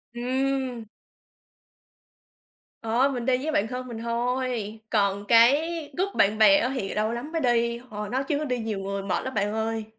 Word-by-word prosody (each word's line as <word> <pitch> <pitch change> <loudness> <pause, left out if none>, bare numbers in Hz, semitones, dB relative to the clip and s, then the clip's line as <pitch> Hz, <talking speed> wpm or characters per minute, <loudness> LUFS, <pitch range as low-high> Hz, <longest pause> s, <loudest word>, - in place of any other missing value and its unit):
Ừm. 255 -1 -1 2.0
Ờ, 235 +5 +2
mình 245 -2 -4
đi 255 0 +3
với 295 +5 -3
bạn 215 -7 +1
thân 255 +1 -5
mình 235 -2 -7
thôi, 235 -1 -2
còn 200 -2 +1
cái 235 +6 +6 0.4
group 390 +2 -1
bạn 205 +2 +3
bè 220 +7 +7
á 265 -3 0
thì 195 -7 -3
lâu 215 +1 0
lắm 240 +6 -5
mới 330 -1 -1
đi, 235 -1 +1
ờ, 210 -1 -5
nói 260 +4 -1
chứ 300 0 -1
đi 250 -3 -1
nhiều 220 -3 -3
người 195 0 -3
mệt 195 - -1
lắm 260 - -5
bạn 205 0 0
ơi. 220 0 -2
235 Hz, 180 wpm, -26 LUFS, 215-260 Hz, 2.0 s, bè